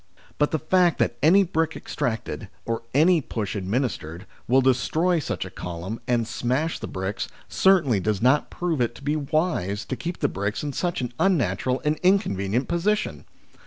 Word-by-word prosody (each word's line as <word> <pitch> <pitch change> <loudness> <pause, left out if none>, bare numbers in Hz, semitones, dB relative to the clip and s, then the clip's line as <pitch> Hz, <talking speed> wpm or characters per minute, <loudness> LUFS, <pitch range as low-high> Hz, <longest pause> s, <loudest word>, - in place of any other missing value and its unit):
But 150 - +3
the 160 - 0
fact 175 +1 +3
that 120 - +1
any 180 +7 +6
brick 165 -2 -1
extracted, 115 -2 -3 0.2
or 115 0 -2
any 160 +5 +4
push 110 -7 -4
administered, 95 - -2 0.2
will 130 +3 +5
destroy 155 +7 +2
such - - -3
a - - -9
column 90 +6 -6
and 120 -2 +1
smash 130 +7 -1
the - - -5
bricks, 95 +2 -4 0.2
certainly 165 - +3
does 105 +1 0
not 130 +6 +3
prove 170 -6 -2
it 120 0 0
to 135 - -13
be 145 +2 0
wise 150 - -1
to 130 - -3
keep 175 +6 -5
the 145 - +1
bricks 100 +1 -3
in 145 -1 -3
such 175 -2 -1
an 125 -1 -4
unnatural 130 - +1
and 150 +1 +2
inconvenient 125 - +1
position. 205 +5 -1
135 Hz, 170 wpm, -24 LUFS, 110-165 Hz, 0.2 s, any